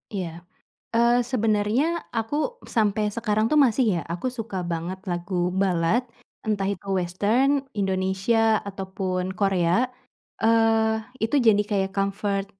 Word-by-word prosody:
Iya. 175 -4 -5 0.5
Eee, 235 +1 +4
sebenarnya 220 +2 +2 0.3
aku 290 - -1 0.2
sampai 210 -1 +2
sekarang 215 -1 0
tuh, 305 - +5
masih, 250 +1 +2
ya. - - -5
Aku 180 +9 -3
suka 225 -5 -5
banget 170 +3 -3
lagu 175 0 -1
ballad, 185 +3 +2 0.5
entah 205 -2 0
itu 200 - -7
western, 205 +10 +1 0.2
Indonesia, 195 +3 +2
ataupun 190 -2 -3
Korea. 190 +2 +2 0.6
Eee, 225 -1 +3 0.2
itu 225 +6 +1
jadi 215 -2 +6
kayak 195 -2 -1
comfort, 195 0 -1
205 Hz, 120 wpm, -24 LUFS, 190-225 Hz, 0.6 s, jadi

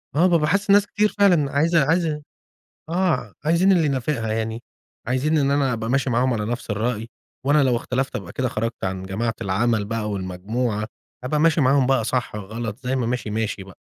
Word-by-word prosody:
آه 175 +4 +5
بابقي 165 -4 +3
حاسسس 200 +2 0
ناس 205 0 +5
كتير 210 0 +1
فعلًا 175 -9 +4
عايزة 160 +1 +3
عايزة 160 -1 +1 0.7
آه، 180 0 0
عايزين 170 +5 +4
اللي 170 -4 +4
ينافقها 130 -5 -1
يعني، 110 +1 -3 0.4
عايزين 140 +6 +1
إن 140 -1 +2
أنا 140 -3 +2
أبقى 110 0 -3
ماشي 135 0 +1
معاهم 125 +2 +2
على 105 -2 -2
نفْس 120 +1 -4
الرأي، 115 +2 -2 0.4
وأنا 145 0 +4
لو 125 -2 +2
اختلفت 130 +2 -2
أبقى 95 -4 -5
كده 130 -2 -1
خَرجت 115 0 -3
عن 95 0 -2
جماعة 110 +5 -2
العمل 105 +2 +1
بقى 110 0 -3
والمجموعة، 105 +4 -2 0.4
هابقى 150 +4 0
ماشي 160 0 +3
معاهم 135 0 +3
بقى 135 -4 +2
صح، 125 -2 -2
غلط، 110 +2 -5
زي 125 +1 -1
ما 125 - 0
ماشي 120 -3 -2
ماشي 110 -2 -2
بقى. 95 -1 -14
125 Hz, 190 wpm, -22 LUFS, 110-150 Hz, 0.7 s, آه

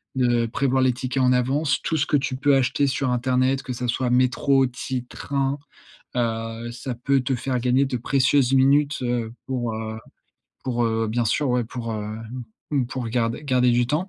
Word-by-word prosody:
De 120 -2 +2
prévoir 130 +2 +1
les 130 -1 +4
tickets 130 +1 -2
en 125 - +4
avance, 140 +4 +1
tout 160 - -1
ce 140 - +1
que 145 - +2
tu 130 -1 -2
peux 140 +2 +2
acheter 135 +2 +2
sur 130 -1 0
internet, 130 +2 +1
que 130 - -5
ça 125 +1 -3
soit 125 +1 0
métro, 130 +2 +3
ti 125 +1 -4
et 125 - -5
train. 135 +1 -2 0.6
Heu, 115 0 -2
ça 125 +1 -5
peut 135 +3 +1
te 130 +1 -1
faire 130 0 -2
gagner 130 +3 +2
de 130 - -2
précieuses 130 +1 +2
minutes, 140 +2 +3
heu, 120 -2 -1
pour, 120 -4 -2
heu 110 0 -5 0.7
pour 120 -2 0
heu, 110 0 0
bien 120 +2 0
sûr, 140 +5 +1
ouais, 125 -1 +1
pour, 115 0 -5
heu, 110 - -3
m 115 +3 -7 0.3
m 135 -4 +1
pour 125 -2 -4
garder 115 +3 -1
garder 125 -3 +3
du 120 0 +2
temps 155 +8 -1
125 Hz, 200 wpm, -23 LUFS, 120-135 Hz, 0.7 s, les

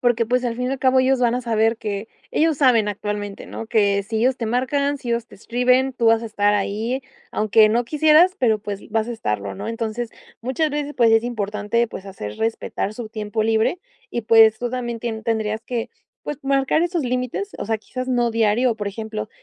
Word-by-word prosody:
Porque 240 -2 +2
pues 250 +2 +1
al 235 -1 -1
fin 250 +1 -2
y - - -2
al 270 - -3
cabo, 260 0 +4
ellos 260 0 +3
van 240 -1 +3
a 250 - -1
saber 225 -1 +1
que. 210 -1 -4 0.2
Ellos 315 -2 +2
saben 240 -6 +4
actualmente, 205 0 -4
¿no?, 225 - -7
que 205 -3 +2
sí 220 +2 -3
ellos 255 +3 +2
te 235 - -4
marcan, 280 +4 0
si 255 - -8
ellos 235 0 -1
te - - -16
escriben, 250 +4 +1
tú 235 -2 0
vas 225 0 +4
a - - -4
estar 205 -1 +1
ahí, 220 +6 -1 0.3
aunque 215 0 +4
no 240 +2 +1
quisieras, 315 +6 +5
pero 225 - +3
pues 200 -1 -6
vas 225 +1 0
a 240 - -2
estarlo, 105 - -3
¿no? - - -6
Entonces, 230 +1 -3 0.3
muchas 265 +6 0
veces, 290 0 -3
pues 235 -2 +4
es 225 +1 +4
importante, 210 0 -1
pues 195 - -8
hacer 105 - -7
respetar 220 -2 -2
su 225 0 -7
tiempo 215 0 -3
libre, 220 +9 +1 0.3
y 235 - -2
pues 220 0 +6
tú 245 - -2
también, 240 -2 -3
tien 225 -2 -4
tendrías 220 -1 -1
que, 240 -2 -3 0.3
pues 295 - -4
marcar 275 +3 +2
esos 345 -2 0
límites. 255 - -2
O - - -3
sea, 220 +1 -1
quizás 255 +4 -6
no 240 -2 +2
diario. 225 +2 +2
O - - -10
por 205 -2 -4
ejemplo, 220 +1 -5
230 Hz, 215 wpm, -22 LUFS, 215-255 Hz, 0.3 s, pues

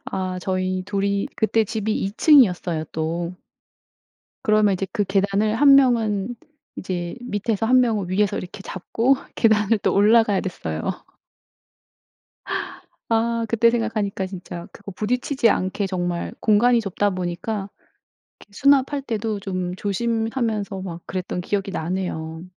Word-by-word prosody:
아 185 -1 -3
저희 185 0 -1
2 200 -1 -1
이 200 0 0
그때 220 0 +2
집이 215 +1 -2
2 195 -1 -2
층이었어요 185 - +4
또. 170 +2 -2 1.1
그러면 215 -4 +3
이제 190 +1 -2
그 205 - 0
계단을 200 +2 +1
1 275 +2 +7
명은 235 -4 +2 0.4
이제 175 -2 -4
밑에서 220 -2 -1
1 255 +3 +5
명은 220 -7 +1
위에서 200 +2 +1
이렇게 190 +2 -7
잡고 230 +8 0 0.2
계단을 220 -1 +3
또 - - +1
올라가야 210 0 +4
됐어요. 80 - -4 2.3
아. 230 0 +1
그때 230 0 +4
생각하니까 220 -4 -1
진짜 180 -2 -8
그거 200 0 -10
부딪히지 240 +4 0
않게 190 +1 0
정말 175 -2 -3
공간이 235 +3 +4
좁다 205 0 0
보니까 185 +3 -3 0.7
이렇게 - - -18
수납할 280 +3 +3
때도 220 -4 -3
좀 185 -2 -3
조심하면서 225 0 -2
막 175 -3 -7
그랬던 180 -1 -4
기억이 195 +1 -2
나네요. 160 -2 -4
205 Hz, 275 characters per minute, -22 LUFS, 185-225 Hz, 2.3 s, 1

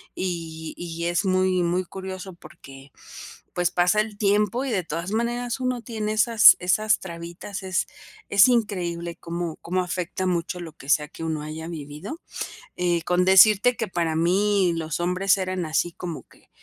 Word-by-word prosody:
Y 165 -3 -4
y 170 -1 -5
es 175 +4 0
muy, 185 -1 +2
muy 175 +2 0
curioso 190 0 -7
porque, 140 -4 -14 0.6
pues, 175 -1 +1
pasa 180 +4 +3
el 215 -1 -6
tiempo 210 +4 +1
y, 265 - -2
de 190 -4 0
todas 170 +3 -4
maneras, 240 +2 -1
uno 255 -1 -1
tiene 215 -2 -3
esas 220 -1 +7
esas 215 +4 +2
trabitas. 170 +3 -8
Es 185 -2 -1 0.4
es 200 +4 +7
increíble 175 -8 -1
cómo 170 -1 -4
cómo 185 +2 -2
afecta 180 +1 -3
mucho 180 0 -1
lo 165 -3 -8
que 140 -3 -13
sea 150 0 +3
que 165 - -10
uno 160 -2 -2
haya 155 +1 -6
vivido. 160 - -7 0.6
Eh, 175 -1 +1
con 180 +1 +2
decirte 210 +5 +6
que 225 -1 -3
para 170 -3 -1
mí 185 +2 +2
los 160 0 -3
hombres 180 +3 +2
eran 185 -2 -2
así 160 +2 0
como 170 -2 -7
que - - -24
180 Hz, 165 wpm, -24 LUFS, 170-205 Hz, 0.6 s, esas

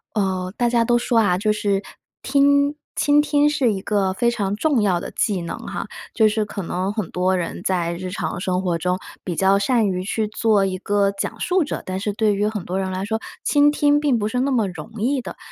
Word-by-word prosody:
哦， 185 -2 -1
大 240 - +2
家 235 -1 +3
都 240 +1 +3
说 240 0 0
啊， 190 -5 +3
就 210 +2 +1
是 200 -2 0 0.4
听 285 +1 +3 0.2
倾 290 0 +4
听 295 0 +3
是 275 -6 +2
一 195 - -2
个 200 -2 0
非 235 +5 +1
常 205 -5 -1
重 285 -2 +2
要 190 -4 +2
的 - - -6
技 200 -4 0
能 170 - -5
哈， - - -5 0.3
就 220 -2 +4
是 215 0 0
可 205 -1 -6
能 185 +2 -2
很 210 -4 -3
多 185 +1 +1
人 175 -2 -4
在 175 -2 0
日 180 +1 -5
常 190 - -3
生 185 0 0
活 180 -3 0
中 180 +2 -1 0.2
比 175 - -3
较 195 +1 +4
善 225 +2 +2
于 185 -1 -2
去 215 +2 -1
做 215 -2 +2
一 185 -1 -2
个 200 +1 +1
讲 195 - -4
述 365 -1 +1
者， 295 - -4
但 185 0 -3
是 205 +2 -2
对 210 0 +1
于 205 +1 0
很 210 -4 -4
多 185 - -3
人 190 -1 -2
来 185 +1 -3
说， 220 +1 -1 0.2
倾 290 0 +4
听 290 0 +3
并 275 -6 +2
不 210 - -1
是 250 +3 -1
那 275 +2 0
么 230 -6 +2
容 185 +4 -8
易 265 +3 +1
的。 - - -8
205 Hz, 250 characters per minute, -21 LUFS, 190-240 Hz, 0.4 s, 倾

